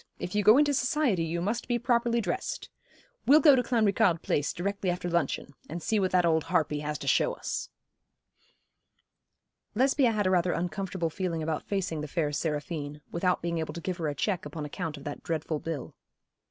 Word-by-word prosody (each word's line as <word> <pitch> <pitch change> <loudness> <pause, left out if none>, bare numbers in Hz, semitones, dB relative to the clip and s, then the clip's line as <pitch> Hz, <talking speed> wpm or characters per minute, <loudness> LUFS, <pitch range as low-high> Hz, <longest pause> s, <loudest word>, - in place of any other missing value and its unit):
If 180 - -5
you 210 - +2
go 215 +5 +7
into 290 0 +4
society 255 - +1
you 165 +1 -2
must 220 +5 -2
be 240 - +1
properly 235 -1 +1
dressed. 380 - -3 0.6
We'll 295 +3 +8
go 290 -2 +7
to 250 - +3
Clanricarde 210 -8 +2
Place 145 - 0
directly 195 +1 -2
after 175 0 -2
luncheon, 170 -4 -1 0.2
and 165 +3 -4
see 215 +6 0
what 190 -1 +1
that 180 -1 +3
old 160 -2 +2
harpy 160 -3 +1
has 150 0 -3
to - - -8
show - - +3
us.' - - -4 2.1
Lesbia 265 +1 +3
had 210 -2 0
a 185 - +3
rather 180 -1 +2
uncomfortable 180 -1 -2
feeling 170 -3 -2
about 155 -1 -3
facing 185 -6 -2
the 150 - -4
fair 150 -1 -1
Seraphine, 150 -1 -3
without 180 +1 0
being 170 -1 -1
able 160 -1 -4
to - - -4
give 180 +1 -3
her 165 -3 -2
a 145 - -2
cheque 180 0 -1
upon 150 0 -6
account 155 0 -4
of 140 - -11
that 145 0 -6
dreadful 160 -1 -2
bill. 160 -4 -5
175 Hz, 195 wpm, -28 LUFS, 160-210 Hz, 2.1 s, We'll